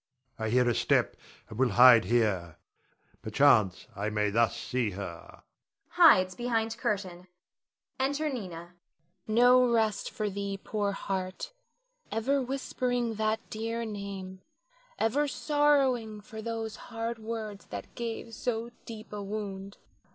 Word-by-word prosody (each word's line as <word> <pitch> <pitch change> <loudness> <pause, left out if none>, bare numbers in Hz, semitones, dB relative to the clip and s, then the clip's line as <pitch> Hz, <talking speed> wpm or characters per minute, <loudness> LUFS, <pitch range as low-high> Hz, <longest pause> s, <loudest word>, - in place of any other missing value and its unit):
I 110 0 -1
hear 125 +2 +3
a 120 - +3
step, - - +2 0.3
and 110 - -9
will 130 -1 +4
hide 120 -4 +8
here, 95 -7 0 0.6
perchance 110 -5 +3
I 100 +2 -2
may 105 -1 0
thus 115 +2 +2
see 125 -3 -1
her 85 -4 -8 0.5
[hides 185 0 +6
behind 225 0 -1
curtain]. 190 -6 -3 0.7
[Enter 285 +4 0
Nina. 265 -4 -2
Nina. 170 0 -10 0.5
No 245 +2 +5
rest 220 -3 +1
for 215 -4 -3
thee 200 0 -3
poor 205 0 -2
heart, 195 - -4 0.6
ever 270 +5 +1
whispering 250 -2 -2
that 215 0 0
dear 230 +1 -3
name, 195 -3 -7 0.6
ever 285 +7 +1
sorrowing 275 -7 +1
for 220 +1 -9
those 225 -1 -4
hard 230 0 -4
words 220 -2 -6
that - - -8
gave 230 -1 -5
so 230 +1 -3 0.2
deep 220 -2 -9
a 205 - -4
wound. 200 -1 -6
215 Hz, 130 wpm, -29 LUFS, 175-235 Hz, 0.7 s, hide